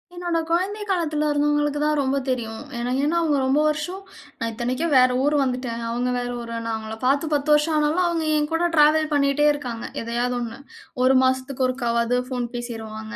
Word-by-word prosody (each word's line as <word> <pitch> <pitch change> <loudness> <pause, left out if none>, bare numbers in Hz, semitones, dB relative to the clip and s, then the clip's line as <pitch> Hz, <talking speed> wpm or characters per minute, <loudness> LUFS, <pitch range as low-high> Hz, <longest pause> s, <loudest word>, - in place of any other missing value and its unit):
என்னோட 350 -1 -2
குழந்தை 380 +5 0
காலத்துல 310 -5 0
இருந்தவங்களுக்கு 295 0 +1
தான் 300 0 +1
ரொம்ப 270 0 0
தெரியும். 230 -3 -3 0.2
என 240 +1 -2
ஏன்னா 305 +4 +1
அவுங்க 300 -4 +1
ரொம்ப 270 +3 +2
வருஷம் 355 +6 -4 0.4
நான் 230 0 -2
இத்தனைக்கும், 255 +8 -1
வேற 255 0 +6
ஊரு 295 +1 +2
வந்துட்டேன். 250 -3 -2
அவுங்க 245 +2 -1
வேற 245 0 -3
ஊரு. 230 0 -7
நான் 230 - -2
அவங்கள 220 0 -5
பார்த்து 280 +4 +2
10 290 +1 0
வருஷம் 300 +2 +3
ஆனாலும், 305 +4 +2
அவுங்க 335 -2 0
என்கூட 325 +3 +1
டிராவல் 305 +1 +4
பண்ணிகிட்டே 285 0 +2
இருக்காங்க. 245 -5 -6 0.2
எதையாவது 240 +2 -1
ஒண்ணு. 235 +1 -6 0.4
ஒரு 260 +1 +5
மாசத்துக்கு 260 0 0
ஒருக்காவாது 240 -1 0
ஃபோன் 250 -2 -2
பேசிருவாங்க. 220 -2 -6
275 Hz, 175 wpm, -23 LUFS, 240-300 Hz, 0.4 s, வேற